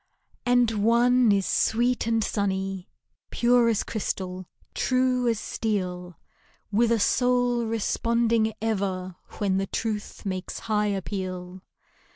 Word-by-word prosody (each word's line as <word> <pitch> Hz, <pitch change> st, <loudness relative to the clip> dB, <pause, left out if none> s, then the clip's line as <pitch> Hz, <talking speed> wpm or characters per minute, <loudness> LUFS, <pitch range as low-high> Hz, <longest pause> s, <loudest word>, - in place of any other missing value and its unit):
And 245 Hz, -2 st, +4 dB
one 240 Hz, +1 st, +4 dB
is 195 Hz, -2 st, +2 dB
sweet 240 Hz, +1 st, +1 dB
and 225 Hz, -1 st, +2 dB
sunny. 195 Hz, -2 st, -2 dB, 0.4 s
Pure 240 Hz, -1 st, +3 dB
as 225 Hz, -, +1 dB
crystal, 185 Hz, -4 st, -4 dB, 0.3 s
true 255 Hz, -1 st, +1 dB
as 230 Hz, -2 st, +1 dB
steel, 180 Hz, -7 st, -3 dB, 0.5 s
With 230 Hz, +3 st, +3 dB
a 230 Hz, -, +3 dB
soul 245 Hz, +1 st, +2 dB
responding 230 Hz, 0 st, +1 dB
ever 190 Hz, -4 st, -2 dB, 0.2 s
When 195 Hz, -3 st, 0 dB
the 195 Hz, 0 st, -1 dB
truth 215 Hz, -1 st, -4 dB
makes 185 Hz, -2 st, -4 dB
high 210 Hz, -1 st, 0 dB
appeal. 185 Hz, -2 st, -4 dB
220 Hz, 115 wpm, -26 LUFS, 190-235 Hz, 0.5 s, And